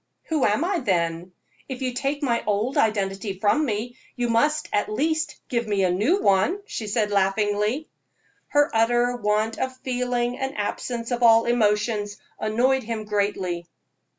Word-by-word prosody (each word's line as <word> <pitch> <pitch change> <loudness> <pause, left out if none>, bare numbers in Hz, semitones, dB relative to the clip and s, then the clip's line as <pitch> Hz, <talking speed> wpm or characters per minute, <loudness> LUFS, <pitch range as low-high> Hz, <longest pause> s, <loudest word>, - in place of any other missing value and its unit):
"Who 310 -5 +2
am 210 +9 +2
I, 370 -1 0
then? 175 - -1 0.4
If 265 0 -5
you 255 -1 -1
take 275 +4 -2
my 235 -4 +1
old 215 +6 0
identity 195 -2 0
from 215 +11 +2
me, 240 0 -3 0.2
you 245 -1 -1
must, 300 +8 +2
at 205 - 0
least, 315 +6 0
give 235 -3 -1
me 200 -2 +1
a 180 - +3
new 225 - +2
one," 200 - +3
she 225 - -5
said, 210 0 0
laughingly. 205 +7 +1 0.6
Her 290 0 +2
utter 240 +2 +2
want 215 0 0
of 260 0 -3
feeling 245 -1 -1
and 265 -2 -3
absence 230 +3 -3
of 245 0 -1
all 230 -1 +6
emotions 210 -2 +1 0.2
annoyed 250 +5 +2
him 220 -2 -4
greatly. 200 -4 -1
230 Hz, 155 wpm, -24 LUFS, 205-255 Hz, 0.6 s, all